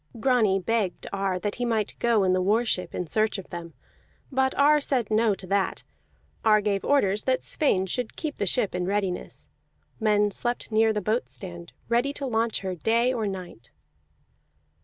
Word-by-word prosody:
Grani 220 -5 +3
begged 205 -1 -1
of - - -9
Ar 195 -2 0
that 205 +3 -3
he - - +1
might 225 -3 0
go 230 -4 +3
in 185 -1 +3
the 185 - +2
war 215 +6 +2
ship 180 -5 -1
in 180 - -2
search 215 +6 0
of 195 - -10
them; 170 -1 -7 0.6
but 265 0 +1
Ar 295 +1 +5
said 250 -6 -1
no 215 -1 +3
to 190 - -9
that. 195 +1 -1 0.6
Ar 215 -1 +5
gave 200 -1 -1
orders 210 -8 +2
that 260 -1 +1
Sweyn 190 -11 +2
should 230 +5 -3
keep 310 -3 -4
the 200 - -1
ship 215 +2 +2
in 180 0 -2
readiness; 195 -2 -3 0.5
men 210 -2 +2
slept 240 +3 -3
near 220 +1 +4
the 210 -1 -1
boat 220 +5 -1
stand, 175 -3 -7 0.2
ready 240 +4 +1
to 285 - -5
launch 230 -2 0
her 190 -1 -3
day 230 +8 +1
or 225 -4 -1
night. 180 - -7
215 Hz, 185 wpm, -26 LUFS, 190-235 Hz, 0.6 s, Ar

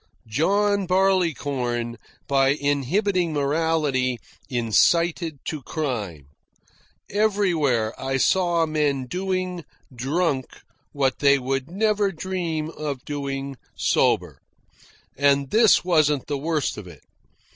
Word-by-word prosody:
John 200 - +1
Barleycorn, 145 -11 0 0.3
by 135 0 +3
inhibiting 170 - 0
morality, 145 -3 0 0.3
incited 160 - +2
to 155 -3 -4
crime. 115 - -4 0.9
Everywhere 175 - +1
I 135 0 -1
saw 175 +2 +2
men 150 -4 0
doing, 185 +2 -3 0.3
drunk, 135 +2 -1 0.4
what 135 -3 0
they 140 -1 +5
would 135 +2 -3
never 205 +1 +1
dream 165 -3 -3
of 145 -5 -5
doing 140 -2 -4 0.2
sober. - - +1 0.7
And 140 0 +2
this 220 -4 +5
wasn't 150 -6 +2
the 145 - -3
worst 155 -5 -1
of 100 - -10
it. 80 -6 -14
150 Hz, 100 wpm, -23 LUFS, 135-180 Hz, 0.9 s, they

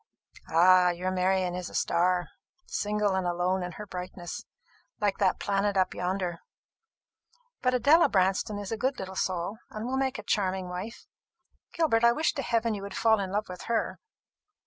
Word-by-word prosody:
"Ah, 180 +2 +6
your 180 +1 -2
Marian 185 -1 +1
is 180 0 -4
a - - -11
star, 175 0 +1 0.4
single 210 -1 0
and 190 -1 0
alone 180 +2 0
in 180 -1 -5
her 210 - -8
brightness, 180 -2 -7 0.6
like 205 -2 0
that 190 -2 +2
planet 200 0 0
up 185 - +2
yonder! 180 -1 -2 1.2
But 255 0 +2
Adela 290 +8 +5
Branston 195 +3 +1
is 205 0 -6
a 225 - -1
good 260 +4 0
little 190 0 -6
soul, 185 +4 -2
and 215 +1 -6
will 260 +2 -1
make 265 -1 0
a - - -7
charming 190 -2 -1
wife. 185 +6 -6 0.7
Gilbert, 290 -9 +2
I 235 0 +6
wish 315 +5 +1
to 275 - -3
heaven 230 -2 0
you 205 - -5
would 200 0 -6
fall 220 -1 +4
in 190 -2 -3
love 210 +2 -1
with 180 -1 -8
her!" 230 - 0
190 Hz, 175 wpm, -28 LUFS, 180-220 Hz, 1.2 s, Ah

